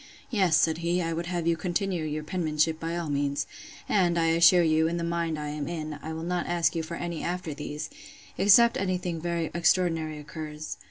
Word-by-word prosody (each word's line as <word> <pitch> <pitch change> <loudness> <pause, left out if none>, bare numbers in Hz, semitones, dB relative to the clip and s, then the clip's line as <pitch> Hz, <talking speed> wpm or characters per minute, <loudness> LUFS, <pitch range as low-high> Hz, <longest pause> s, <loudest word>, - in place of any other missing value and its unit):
Yes, 190 -8 +3
said 160 0 +2
he, 170 +1 0
I 165 -2 -1
would 170 +1 -3
have 175 -2 -2
you 170 0 +3
continue 175 +1 -1
your 155 0 -3
penmanship 155 -2 0
by 165 +1 -3
all 170 -2 -3
means; 145 -1 -1 0.4
and, 175 -4 +2
I 165 -1 +3
assure 170 +2 +6
you, 160 0 +3
in 170 +1 -1
the 170 - -2
mind 170 -1 -1
I 150 -1 -4
am 150 -1 -4
in, 155 -3 -5
I 160 - -6
will 160 0 -5
not 175 0 -2
ask 175 -1 +1
you 165 - 0
for 160 +1 -6
any 170 -2 -4
after 175 -3 -3
these; 150 +1 -5 0.5
except 235 +4 +6
any 185 -1 0
thing 175 -2 -4
very 170 -1 -2
extraordinary 165 -2 +1
occurs. 150 0 -7
165 Hz, 210 wpm, -27 LUFS, 155-175 Hz, 0.5 s, assure